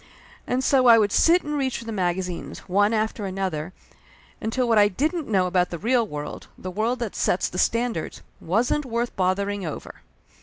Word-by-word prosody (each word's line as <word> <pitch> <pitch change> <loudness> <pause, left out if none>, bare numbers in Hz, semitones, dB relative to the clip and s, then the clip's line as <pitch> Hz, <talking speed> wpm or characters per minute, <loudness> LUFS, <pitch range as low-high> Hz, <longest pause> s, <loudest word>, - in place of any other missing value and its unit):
And 255 +1 0
so 260 -2 +4
I 230 -1 +9
would 210 -2 +2
sit 345 - +4
and 295 0 -3
reach 265 -3 -1
for 230 - -9
the 225 - -5
magazines, 180 -3 -3
one 205 +3 +3
after 220 -2 -1
another, 185 -4 -3 0.7
until 240 +3 -1
what 225 -2 +4
I 205 - +6
didn't 305 - -1
know 190 -4 +2
about 180 0 +1
the 170 - -5
real 235 +4 +1
world, 150 -4 -7
the 185 - -6
world 220 +6 0
that 235 -4 -4
sets 180 - +1
the 180 - -5
standards, 230 -7 -1 0.2
wasn't 230 - 0
worth 235 -2 -3
bothering 195 +2 0
over. 155 -4 -7
210 Hz, 185 wpm, -24 LUFS, 185-240 Hz, 0.7 s, I